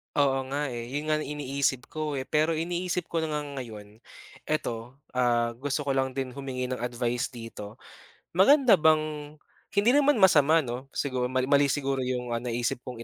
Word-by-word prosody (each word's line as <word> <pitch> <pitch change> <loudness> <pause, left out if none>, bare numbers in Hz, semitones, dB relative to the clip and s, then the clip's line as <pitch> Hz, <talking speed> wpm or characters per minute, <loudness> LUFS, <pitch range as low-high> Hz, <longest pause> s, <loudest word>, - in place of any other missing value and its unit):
Oo, 135 -2 +2
nga 140 +1 -2
eh, 120 -1 -5
yun 145 +5 -3
nga 155 - +3
ang 155 - -4
iniisip 140 -2 -2
ko 155 -1 -3 0.2
pero 155 +2 +2
iniisip 175 +2 -2
ko 170 - 0
na 160 -1 -2
nga 150 - -1 0.2
ngayon 105 -4 -9 0.5
eto 120 -5 -3 0.2
ah, 120 -2 +2
gusto 145 +2 -2
ko 140 - -3
lang 130 -1 0
din 135 -1 -3
humingi 130 -1 -4
ng 130 - -2
advice 120 0 -1
dito. 115 -3 -8 0.6
Maganda 225 - +6
bang 155 -1 +1 0.4
hindi 205 +4 +4
naman 290 +1 +4
masama 165 - +5
no 125 +1 -5
sigur 130 -3 -1
mali 130 0 0
mali 140 0 +5
siguro 135 -1 -1
yung 125 -1 -2 0.2
naisip 120 0 -1
kong 125 -2 -8
135 Hz, 170 wpm, -27 LUFS, 125-155 Hz, 0.6 s, Maganda